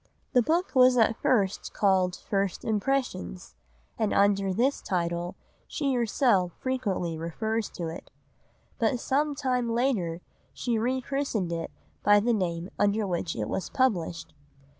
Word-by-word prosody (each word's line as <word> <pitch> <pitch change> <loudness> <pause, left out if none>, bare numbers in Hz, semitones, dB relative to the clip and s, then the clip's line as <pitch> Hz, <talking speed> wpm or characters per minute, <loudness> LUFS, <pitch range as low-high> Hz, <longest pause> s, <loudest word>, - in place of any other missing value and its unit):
The 250 - +6
book 335 +9 0
was 255 -1 +6
at 225 -1 +3
first 200 -6 +1
called 190 -3 +2
First 195 -3 -2
Impressions, 215 -5 -2 0.5
and 220 -2 +1
under 200 -1 +3
this 245 +9 +1
title 175 -1 -2 0.3
she 280 -4 -1
herself 225 - +2
frequently 195 -11 -2
refers 220 +7 -2
to 170 - -5
it; 160 - -8 0.7
but 250 - +1
some 290 +4 0
time 250 -3 0
later 225 -9 0 0.3
she 235 -3 -1
re 255 +3 0
christened 250 -9 -2
it 165 0 -3 0.3
by 205 +1 +6
the 235 +3 +1
name 175 -3 -2
under 205 +1 +2
which 175 -3 -2
it 105 -2 -2
was 185 - -3
published. 180 -11 0
210 Hz, 140 wpm, -27 LUFS, 180-255 Hz, 0.7 s, The